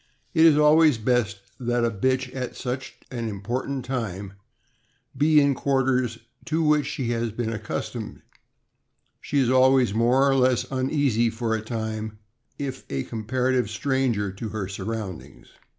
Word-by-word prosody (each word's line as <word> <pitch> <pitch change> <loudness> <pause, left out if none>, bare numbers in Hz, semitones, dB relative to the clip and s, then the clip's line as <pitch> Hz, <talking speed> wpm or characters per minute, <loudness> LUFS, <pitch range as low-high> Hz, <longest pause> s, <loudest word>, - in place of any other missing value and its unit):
It 165 -1 +6
is 150 -2 +5
always 150 -2 +5
best 110 -3 0 0.2
that 120 -1 0
a 115 - +1
bitch 130 +4 0
at 130 -2 -4
such 130 +1 -5 0.2
an 115 -3 -3
important 125 +6 -3
time 100 -7 -4 0.8
be 150 +3 +5
in 140 -1 +3
quarters 130 -3 +1 0.3
to 160 0 0
which 150 -2 +3
she 135 -6 -2
has 115 -1 -1
been 115 0 -3
accustomed; 105 -1 -5 1.0
she 145 - -2
is 130 -3 +3
always 130 -3 +4
more 120 +5 +3
or 135 - +4
less 130 -2 +3
uneasy 130 -3 +1
for 115 0 -2
a 110 - -1
time 110 -1 -4 0.4
if 135 -2 -5
a 70 -1 -2
comparative 125 +1 -1
stranger 120 -4 0
to 100 +4 -6
her 105 -3 -4
surroundings. 100 -1 -6
125 Hz, 145 wpm, -25 LUFS, 110-135 Hz, 1.0 s, It